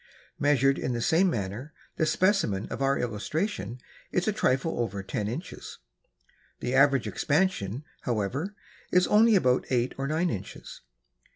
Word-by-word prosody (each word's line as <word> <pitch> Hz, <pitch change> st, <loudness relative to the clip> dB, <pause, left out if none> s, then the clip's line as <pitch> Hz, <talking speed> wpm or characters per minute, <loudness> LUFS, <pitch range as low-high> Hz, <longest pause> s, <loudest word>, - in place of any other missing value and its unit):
Measured 135 Hz, -1 st, +3 dB
in 125 Hz, -, -2 dB
the 120 Hz, -, -2 dB
same 175 Hz, +9 st, +3 dB
manner, 115 Hz, -, -4 dB, 0.2 s
the 160 Hz, -, +1 dB
specimen 175 Hz, -, +1 dB
of -, -, -5 dB
our 135 Hz, 0 st, +2 dB
illustration 125 Hz, -, -3 dB, 0.3 s
is 180 Hz, -, 0 dB
a 215 Hz, -, +2 dB
trifle 135 Hz, -, 0 dB
over 100 Hz, -5 st, -2 dB
ten 105 Hz, +1 st, -3 dB
inches. 145 Hz, -, -6 dB, 0.8 s
The 125 Hz, -, -3 dB
average 135 Hz, -1 st, +4 dB
expansion, 145 Hz, -, 0 dB, 0.2 s
however, 125 Hz, -, -2 dB, 0.4 s
is 180 Hz, 0 st, +4 dB
only 220 Hz, +1 st, +5 dB
about 130 Hz, -8 st, +2 dB
eight 125 Hz, 0 st, +1 dB
or 135 Hz, -, -1 dB
nine 160 Hz, +4 st, 0 dB
inches. 95 Hz, -, -7 dB
135 Hz, 145 wpm, -27 LUFS, 120-175 Hz, 0.8 s, only